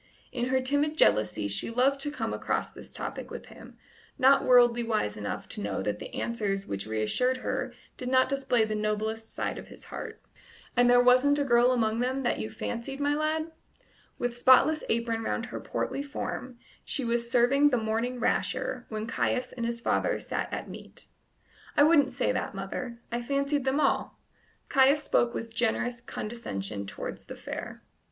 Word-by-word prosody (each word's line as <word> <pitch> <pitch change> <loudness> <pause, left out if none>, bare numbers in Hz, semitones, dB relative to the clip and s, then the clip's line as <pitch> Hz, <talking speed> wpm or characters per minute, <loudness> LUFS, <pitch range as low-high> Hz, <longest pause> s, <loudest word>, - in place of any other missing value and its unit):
In 245 -2 -1
her 260 0 +2
timid 285 +4 0
jealousy 105 - +3
she 100 - +2
loved 260 +4 +2
to 290 - 0
come 295 - -3
across - - -2
this - - -11
topic - - -5
with - - -8
him, - - -14 0.4
not 270 +2 +5
worldly 240 -1 +5
wise 215 - -1
enough 105 -1 -5
to - - -5
know 100 -1 -2
that 105 +1 -2
the - - -8
answers 200 -4 -2
which 100 +1 -4
reassured 110 - +1
her - - -1 0.3
did 250 - -4
not 260 0 +4
display 265 -4 +1
the 215 - -3
noblest 215 +1 -2
side - - -3
of - - -11
his - - -12
heart. - - -6 0.6
"And 245 0 +5
there 245 0 +6
wasn't 255 +4 +5
a 290 - +2
girl 240 -1 +4
among 225 -2 +1
them 255 +2 0
all 270 - -3
that 240 - 0
you 215 - -3
fancied, 235 +4 -5
my 290 0 +2
lad?" 310 +2 -1 0.7
With 245 -1 -2
spotless 260 +5 +5
apron 230 0 0
round - - -2
her - - -6
portly 275 - -3
form 260 -3 -5 0.3
she 270 - -2
was 235 0 0
serving 260 +4 +4
the 250 - +2
morning 230 +3 -1
rasher 245 +1 -1
while 215 -1 -3
Caius 250 +2 -1
and 235 -2 -3
his 235 0 -3
father - - +1
sat - - -3
at - - -4
meat. - - -10 0.7
"I 290 - +7
wouldn't 295 -3 +5
say 255 0 0
that, 255 -5 -3
mother: 215 +5 -5
I 240 +1 -1
fancied 280 +2 0
them 265 +2 +1
all." 280 - 0 0.5
Caius 275 +2 +4
spoke 240 0 +2
with 225 0 -5
generous 240 +1 0
condescension 105 - -5
towards - - -7
the - - -7
fair. - - -7
245 Hz, 180 wpm, -28 LUFS, 225-270 Hz, 0.7 s, I